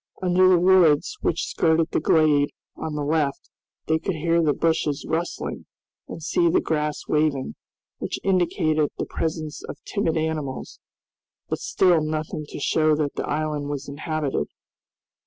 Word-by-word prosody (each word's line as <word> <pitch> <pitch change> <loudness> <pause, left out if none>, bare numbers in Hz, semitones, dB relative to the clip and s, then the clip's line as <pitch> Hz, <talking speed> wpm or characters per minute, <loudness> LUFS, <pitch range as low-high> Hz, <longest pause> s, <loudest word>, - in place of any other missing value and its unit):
Under 185 0 +4
the 185 - +6
woods 175 - +4
which - - 0
skirted 160 -1 +1
the - - +1
glade 150 -2 +3 0.3
on 155 -1 -5
the 150 - -2
left 145 -2 -1 0.3
they 160 0 +1
could 180 +2 -2
hear 165 +2 +2
the 155 -2 +3
bushes 150 -1 0
rustling 165 +2 -3 0.4
and - - -8
see 345 -1 +2
the 365 +2 +3
grass 150 - -2
waving, 150 -3 +1 0.5
which - - -3
indicated 160 -5 +2
the - - -2
presence 155 -2 -4
of - - -7
timid 185 -6 -1
animals, 155 -4 -3 0.7
but - - -2
still 175 -4 +3
nothing 155 0 -3
to - - -7
show 155 +1 +2
that 150 -2 -1
the - - -4
island 150 -1 -2
was 145 -1 -4
inhabited. 145 - -2
155 Hz, 150 wpm, -24 LUFS, 150-165 Hz, 0.7 s, the